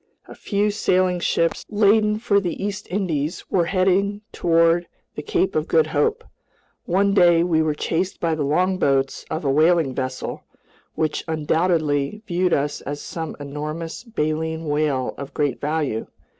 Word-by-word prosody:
A - - -10
few 205 0 0
sailing 185 -3 +1
ships, 165 -1 0
laden 210 0 +3
for 210 -2 +2
the 180 -1 -4
East 205 0 -4
Indies, 170 -4 -2
were 175 -3 +2
heading 195 +3 +1
toward 165 0 +2 0.3
the - - -5
Cape 380 -3 0
of - - 0
Good 475 - +4
Hope. 455 +1 0 0.6
One 195 +3 +2
day 175 -3 +5
we 165 -2 +2
were 155 -1 0
chased 180 +5 -2
by 165 -1 0
the 155 - -2
longboats 145 -3 +1
of 160 - -3
a 135 - +2
whaling 155 -1 +3
vessel, 130 0 -4 0.5
which 155 -1 -1
undoubtedly 160 +2 0
viewed 180 -2 0
us 145 0 0
as 145 +1 -5
some 160 0 -6
enormous 155 +5 -5
baleen 160 -6 -2
whale 145 -3 0
of 140 -1 -8
great 145 -3 -1
value. 145 -6 -1
165 Hz, 150 wpm, -22 LUFS, 150-195 Hz, 0.6 s, day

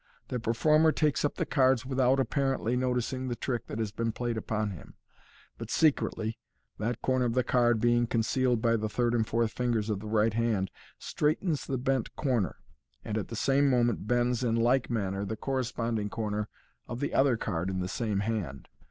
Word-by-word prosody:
The 125 - -2
per 115 0 -1
former 155 +4 +4
takes 150 -2 +1
up 145 - 0
the - - -1
cards 130 -3 +3
without 130 0 +2
apparently 135 -3 0
noticing 130 +1 -1
the 120 - -2
trick 120 -1 -3
that - - -5
has 110 -2 -2
been 115 +2 -1
played 120 +1 -3
upon 110 -1 -2
him, 85 -8 -11 0.6
but - - -6
secretly 115 -7 +1 0.4
(that 115 +2 -2
corner 130 -1 +2
of 120 -1 -1
the 125 - +3
card 120 -2 +3
being 120 +1 +3
concealed 120 +1 +1
by 115 -1 +3
the 110 0 -2
third 120 +2 0
and 110 -2 +1
fourth 115 -1 +1
fingers 115 -3 -1
of 100 - -1
the 105 - -8
right 110 0 +2
hand) 110 -4 0 0.3
straightens 155 +1 -1
the 135 - -1
bent 130 -1 -1
corner, 125 - 0 0.5
and 105 - -3
at 110 - -2
the 115 - -6
same 140 +4 +3
moment 120 -5 +1
bends 120 +1 +1
in 115 -2 +1
like 120 +3 +2
manner 100 -4 -1
the 110 +2 -4
corresponding 115 -5 -2
corner 105 -1 -3 0.4
of 120 - -5
the 145 - -2
other 135 -3 +3
card 95 -4 -2
in 95 -1 -2
the 90 - -2
same 105 0 -1
hand. 100 -11 -3
120 Hz, 195 wpm, -29 LUFS, 110-130 Hz, 0.6 s, former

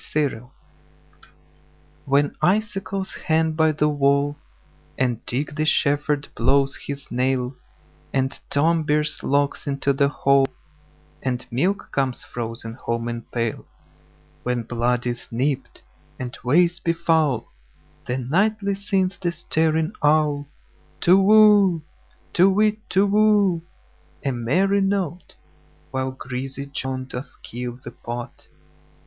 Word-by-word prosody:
Winter 135 -6 0 1.6
WHEN 140 +1 +2
icicles 195 -1 0
hang 160 0 +3
by 160 0 +3
the 150 0 +1
wallAnd 140 -3 -1
Dick 140 +4 -2
the 155 +1 -1
shepherd 145 -1 +1
blows 135 +3 +2
his 140 -1 -6
nail, 125 0 0 0.6
And 135 0 +1 0.2
Tom 160 +3 +3
bears 150 0 0
logs 145 +1 0
into 140 0 +1
the 140 +1 +3
hall, 140 -1 +3 0.7
And 125 -1 -2
milk 180 +12 0
comes 135 -3 -1
frozen 115 -1 -6
home 115 -1 -3
in 120 0 -4
pail; 115 -2 -3 0.7
When 125 -1 -1
blood 120 +1 0
is 120 -1 -3
nipt, 135 +3 -2 0.3
and 125 -1 -5
ways 170 +7 +3
be 170 -2 0
foul, 160 -6 +1 0.6
Then 125 0 -2
nightly 200 +6 +1
sings 195 -1 -1
the 175 -2 0
staring 160 -1 0
owlTu 150 -1 +3 0.8
whoo! 205 -5 +6 0.5
To 185 +3 +5
whit, 215 +2 +2
Tu 195 +2 +3
whoo! 205 -4 +3 0.6
A 135 - +2
merry 180 +12 +1
note! 190 -4 -2 0.6
While 130 0 -1
greasy 130 +1 -5
Joan 130 -2 -4
doth 130 0 -6
keel 120 +1 -6
the 120 - -7
pot. 120 0 -7
145 Hz, 115 wpm, -23 LUFS, 130-170 Hz, 1.6 s, whoo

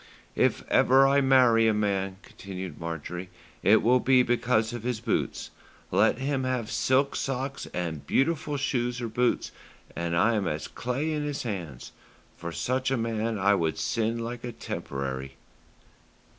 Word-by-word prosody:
"If - - +2
ever 135 +2 +5
I 140 +1 +4
marry 125 -4 +5
a 110 - +3
man," 95 -2 -1
continued 95 -5 -8
Marjorie, 85 +2 -5 0.3
"it 105 +3 +5
will 125 +2 +5
be 130 0 +4
because 120 -2 +1
of 120 - -5
his 120 -1 -2
boots. 115 -1 -2 0.4
Let - - +3
him 135 0 -1
have 125 -4 -2
silk 135 +2 +2
socks 135 +1 -3
and 85 -5 -4
beautiful 150 0 +1
shoes 125 -3 -1
or 120 - -3
boots, 120 +2 0 0.4
and 85 0 -2
I 115 +7 +4
am 105 -4 0
as 75 -1 -3
clay 130 +6 -2
in 150 -1 -2
his 145 -1 -3
hands. 85 - -6 0.4
For 85 0 -6
such 130 - -1
a 135 - +1
man 115 -1 -1
I 100 +1 +3
would 80 -5 0
sin 115 0 -1
like 115 +1 -5
a 120 - -4
'temporary.'" 65 - -5
115 Hz, 155 wpm, -27 LUFS, 95-130 Hz, 0.4 s, ever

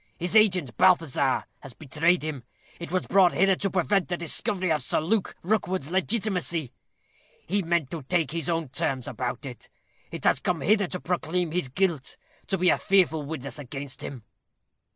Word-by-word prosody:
His 175 +4 -2
agent, 185 - +4
Balthazar, 165 -7 +3
has 135 -3 -11
betrayed 160 +5 +1
him. 150 -5 -4 0.4
It 170 - -7
was 185 0 0
brought 190 -3 +4
hither 195 +1 +4
to 195 - -1
prevent 190 +1 +1
the 175 - -1
discovery 180 +2 -1
of 155 -2 +1
Sir - - 0
Luke 185 +6 0
Rookwood's 185 -5 -1
legitimacy. 185 - -1 0.7
He 200 +4 0
meant 170 -5 0
to 165 -4 -5
make 165 -6 +1
his 165 +1 -2
own 165 -4 -1
terms 135 -3 -2
about 125 +2 -4
it. 125 -4 -9 0.4
It - - -7
has - - +3
come 175 -4 -1
hither 205 +4 +3
to 180 - -4
proclaim 175 -1 -1
his 175 -6 -1
guilt 165 -2 -1 0.3
to 195 - 0
be 180 0 +3
a - - +3
fearful 180 -5 +3
witness 140 -1 -6
against 140 0 -6
him." 130 -5 -7
170 Hz, 170 wpm, -26 LUFS, 145-185 Hz, 0.7 s, agent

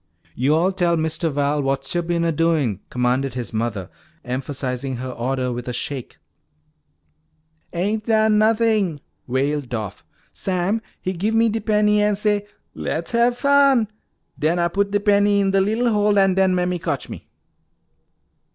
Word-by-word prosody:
"Yo'all 155 +8 +2
tell 175 -3 +1
Mistuh 160 +1 -1
Val 145 0 0
whats 135 -1 -1
yo' 175 - +1
bin 170 0 -1
a 165 - +2
doin'!" 155 - +1
commanded 125 +1 0
his 120 -2 -5
mother, 110 -4 -2 0.4
emphasizing 130 0 -3
her 130 +1 -5
order 125 +1 -2
with 120 0 -5
a 125 - -3
shake. 130 +1 -5 1.5
"Ain't 205 +5 -1
done 220 -1 +3
nothin'," 215 -7 +2 0.3
wailed 135 +1 -1
Doff. 105 -4 -5 0.3
"Sam, 190 +4 -1 0.2
he 185 - -3
give 205 +6 -1
me 230 0 +4
de 220 +1 -2
penny 210 0 +2
an' 210 0 +2
say, 205 0 0 0.3
'Le's - - -4
hab 240 +1 +3
fun.' 275 -3 +4 0.5
Den 160 +3 +1
Ah 170 0 +1
puts 200 +3 0
de 205 0 +1
penny 205 0 +3
in 195 -1 +2
de 195 0 +3
lil' 225 +4 +1
hole 210 0 +2
an' 195 -1 +4
den 190 -1 +3
Mammy 180 0 0
cotch 160 -5 -3
me." - - -10
175 Hz, 155 wpm, -21 LUFS, 135-210 Hz, 1.5 s, me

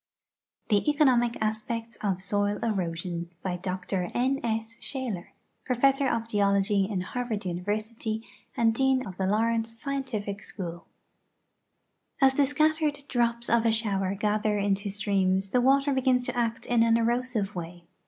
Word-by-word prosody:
THE 205 -2 +4
ECONOMIC 255 -6 +3
ASPECTS 225 +2 -3
OF 190 -3 -2
SOIL 205 +1 +1
EROSION 175 -5 -2
By 185 -2 -1
Du 180 +1 -5
X. 185 +1 -6 0.2
S. 230 -3 -1
Shalkr, 235 -11 -3 0.4
Professor 270 +2 +2
of 230 -1 -1
Geology 200 -1 +2
in 195 -4 -1
Harvard 225 0 -3
University 215 +5 -3 0.3
and 225 -1 +4
Dean 265 +1 +2
of 185 -3 -8
(he 190 - 0
Laurence 225 +3 +1
Scimtific 230 -6 -4
School 175 -5 -5
II 170 - -15 1.4
As 265 - +5
the 280 0 +3
scattered 305 0 +1
drops 235 -1 0
of 235 -1 +3
a 230 - +3
shower 200 -4 0
gather 210 +1 +1
into 200 0 0
streams 195 -1 +1
the 245 +4 +2
water 275 +2 +3
begins 255 -1 +2
to - - -2
act 230 -1 -1
in 240 -1 +2
an 230 0 +4
erosive 235 -3 0
way. 175 0 -7
225 Hz, 145 wpm, -27 LUFS, 200-245 Hz, 1.4 s, As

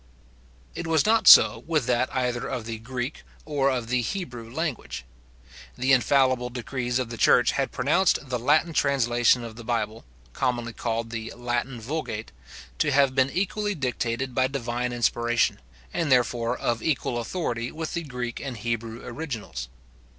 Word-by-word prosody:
It - - -5
was 160 -3 +3
not 225 +1 +3
so - - +9
with 155 -6 +1
that 125 +1 +1
either 125 -2 -1
of 125 -4 -4
the 115 -1 -5
Greek 125 +4 -5 0.2
or 145 -3 +1
of 125 -3 -2
the 125 0 +2
Hebrew 120 - -5
language. 120 - -4 0.7
The 130 +2 +3
infallible 130 -1 +3
decrees 125 0 -3
of 125 -3 -3
the 115 - -6
church 125 - +5
had 135 -1 -1
pronounced 150 +9 +2
the 125 -1 -1
Latin 155 +7 +2
translation 120 -4 +3
of 115 -1 -8
the 120 - -8
Bible, 115 -2 -2 0.3
commonly 120 -1 -1
called 115 0 -3
the 115 -1 -5
Latin 120 +1 -2
Vulgate, 115 -3 -4 0.5
to - - +2
have 140 -1 +4
been 130 0 +3
equally 205 +4 -1
dictated 125 -2 -2
by 130 +1 +2
divine 125 -2 -2
inspiration, 120 -1 +1 0.3
and 165 -5 -1
therefore 120 -2 +2
of 115 -1 -1
equal 130 -4 -1
authority 120 -3 -3
with 160 0 -5
the 170 - -1
Greek 125 -5 -5
and 130 -4 -5
Hebrew 115 +1 -4
originals. 115 - -5
125 Hz, 160 wpm, -26 LUFS, 115-140 Hz, 0.7 s, so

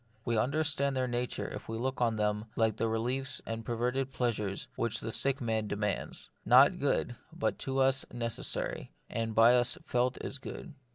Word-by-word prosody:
We 115 - +1
understand 140 +2 +1
their 130 -1 +1
nature 120 0 -2
if - - -8
we 115 - -3
look 130 +2 -2
on 115 -2 +2
them 105 0 0
as - - -28
like 110 -2 +2
the 115 - +1
reliefs 125 +4 -1
and 115 0 -4
perverted 125 +3 -1
pleasures 105 -6 -1
which 115 -1 +1
the 115 - -3
sick 135 +4 +1
man 110 -4 -1
demands; 105 -1 -3
not - - +6
good, - - 0
but - - -2
to 135 0 -3
us 135 0 +4
necessary, 115 -1 -3 0.2
and 115 -1 -2
by 115 +2 +7
us 125 0 +2
felt 125 +1 +1
as 135 - -3
good. - - -8
120 Hz, 180 wpm, -31 LUFS, 115-130 Hz, 0.2 s, by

